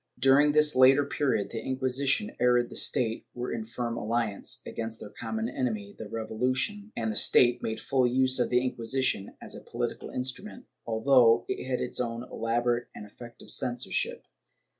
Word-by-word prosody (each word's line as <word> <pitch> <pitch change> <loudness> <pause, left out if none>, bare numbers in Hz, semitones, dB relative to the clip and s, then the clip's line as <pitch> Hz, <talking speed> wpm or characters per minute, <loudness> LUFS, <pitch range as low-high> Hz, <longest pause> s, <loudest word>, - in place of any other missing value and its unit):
^ - - -24
During 140 +2 +5
this 150 0 +4
later 135 +2 +6
period, 140 -7 -1
the 115 - -4
Inquisition 130 - -1
and 120 -1 +3
the - - -9
State 115 -2 0
were 125 +1 -4
in 110 - -4
firm 115 0 -4
alliance, 115 -3 -2
against 115 -1 -5
their 105 - -9
common 110 0 -4
enemy 110 -6 -3
the 110 - -8
Revolution, 130 - -2
and 110 -1 -1
the - - -5
State 120 +2 +4
made 110 0 -3
full 130 -2 +1
use 130 +1 +3
of 125 - +1
the 125 +1 +2
Inquisition 125 -3 -1
as - - -10
a - - -9
political - - -4
instrument, 130 - -5 0.2
although 115 0 +4
it - - -4
had 125 - -1
its 125 - -2
own 120 -1 -3
elaborate 120 0 -1
and 105 - -8
effective 120 +3 -12
censorship. 120 -6 -2
125 Hz, 170 wpm, -28 LUFS, 115-130 Hz, 0.2 s, later